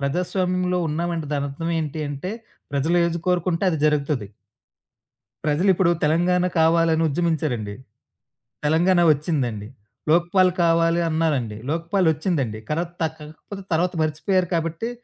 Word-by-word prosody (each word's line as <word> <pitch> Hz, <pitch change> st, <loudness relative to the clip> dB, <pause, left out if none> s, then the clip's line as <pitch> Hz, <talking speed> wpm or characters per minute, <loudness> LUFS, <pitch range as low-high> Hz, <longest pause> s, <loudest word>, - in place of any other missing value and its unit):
ప్రజాస్వామ్యంలో 180 Hz, +4 st, 0 dB
ఉన్నామంటే 165 Hz, +1 st, -2 dB
దానర్థమేంటి 150 Hz, +2 st, -2 dB
అంటే 145 Hz, +6 st, -5 dB, 0.4 s
ప్రజలు 155 Hz, +5 st, +1 dB
ఏజీ 170 Hz, 0 st, -1 dB
కోరుకుంటే 180 Hz, 0 st, +1 dB
అది 160 Hz, -, -1 dB
జరుగుతది. 145 Hz, -6 st, 0 dB, 1.2 s
ప్రజలిప్పుడు 175 Hz, +3 st, +3 dB
తెలంగాణ 175 Hz, +4 st, +2 dB, 0.2 s
కావాలని 165 Hz, 0 st, +3 dB
ఉజ్జమించారండి. 150 Hz, -9 st, -1 dB, 0.9 s
తెలంగాణ 175 Hz, +4 st, +3 dB
ఒచ్చిందండి. 130 Hz, -9 st, -2 dB, 0.4 s
లోక్పాల్ 175 Hz, +2 st, +4 dB
కావాలి 165 Hz, 0 st, +3 dB
అన్నారండి. 145 Hz, -9 st, 0 dB
లోక్పాల్ 170 Hz, +4 st, 0 dB
ఒచ్చిందండి. 145 Hz, -, -2 dB
కలత్ 170 Hz, +3 st, -2 dB
తక్ 160 Hz, 0 st, -3 dB, 0.3 s
కలత్ 195 Hz, -1 st, -8 dB
తర్వాత 180 Hz, +3 st, +1 dB
మర్చిపోయారు 180 Hz, +4 st, 0 dB
కాబట్టి 165 Hz, +7 st, -2 dB
165 Hz, 105 wpm, -23 LUFS, 150-175 Hz, 1.2 s, లోక్పాల్